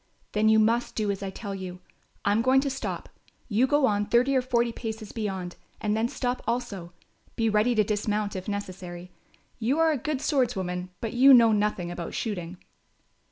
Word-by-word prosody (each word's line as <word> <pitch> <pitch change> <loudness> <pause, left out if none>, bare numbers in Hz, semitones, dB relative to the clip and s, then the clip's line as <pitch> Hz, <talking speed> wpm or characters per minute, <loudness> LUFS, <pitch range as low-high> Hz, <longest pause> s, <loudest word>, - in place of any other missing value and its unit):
"Then 215 +1 +3
you 220 - +6
must 230 +3 +2
do 210 -2 0
as 195 - -5
I 195 - -3
tell 200 +1 -6
you. 185 -2 -6 0.5
I 200 - +3
am 210 +2 +3
going 260 +2 +4
to 275 -1 -1
stop; 270 - -4 0.4
you 235 +3 +2
go 290 0 +3
on 205 -3 +1
thirty 250 +3 +3
or 260 - +4
forty 240 -2 +1
paces 220 -2 -6
beyond 190 -5 -4 0.2
and 210 0 0
then 225 +1 +1
stop 250 0 -2
also. 230 -8 -3 0.4
Be 225 -1 +1
ready 215 +3 +3
to 215 - +4
dismount 210 0 -1
if 185 +2 -5
necessary. 185 -3 -6 0.5
You 245 +6 +1
are 325 0 +4
a 300 - 0
good 300 +4 -2
swordswoman, 190 - -1
but 225 - -3
you 265 +2 +8
know 230 -2 +6
nothing 205 -4 0
about 175 -1 -6
shooting." 180 -5 -4
215 Hz, 190 wpm, -27 LUFS, 195-245 Hz, 0.5 s, you